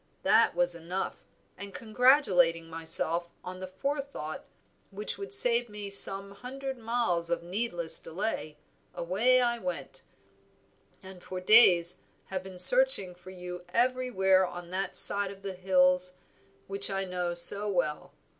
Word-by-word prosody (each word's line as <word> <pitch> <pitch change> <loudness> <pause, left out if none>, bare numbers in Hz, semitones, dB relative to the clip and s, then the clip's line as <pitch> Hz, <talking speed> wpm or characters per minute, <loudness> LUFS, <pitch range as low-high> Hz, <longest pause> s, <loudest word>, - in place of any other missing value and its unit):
That - - +2
was 175 0 -1
enough, 170 +3 -7 0.3
and 200 +1 -10
congratulating 205 - +1
myself 165 +1 0 0.2
on 185 0 -9
the 185 - -8
forethought 275 - -6 0.5
which 205 +2 -7
would 400 - -8
save 245 - 0
me 205 -1 -8
some 195 0 +6
hundred 260 +5 -8
miles 225 -8 -2
of 170 0 -3
needless 175 -3 0
delay, 165 -4 -5 0.4
away 225 +9 +1
I 240 -1 -1
went, 270 +3 -7 1.0
and 190 -1 -13
for 185 - -7
days 180 -4 +4 0.2
have 190 -1 -6
been 190 -1 -12
searching - - +5
for 180 +1 -16
you 180 -1 -10
every 255 +5 -1
where 190 -4 +2
on 175 -1 -8
that 190 0 -4
side 200 -1 +5
of 195 0 -13
these 190 -2 -7
hills 180 -1 +1 0.5
which 195 0 -1
I 195 0 -4
know 180 -1 -4
so 200 +4 +2
well. 175 -6 -3
190 Hz, 140 wpm, -27 LUFS, 180-230 Hz, 1.0 s, some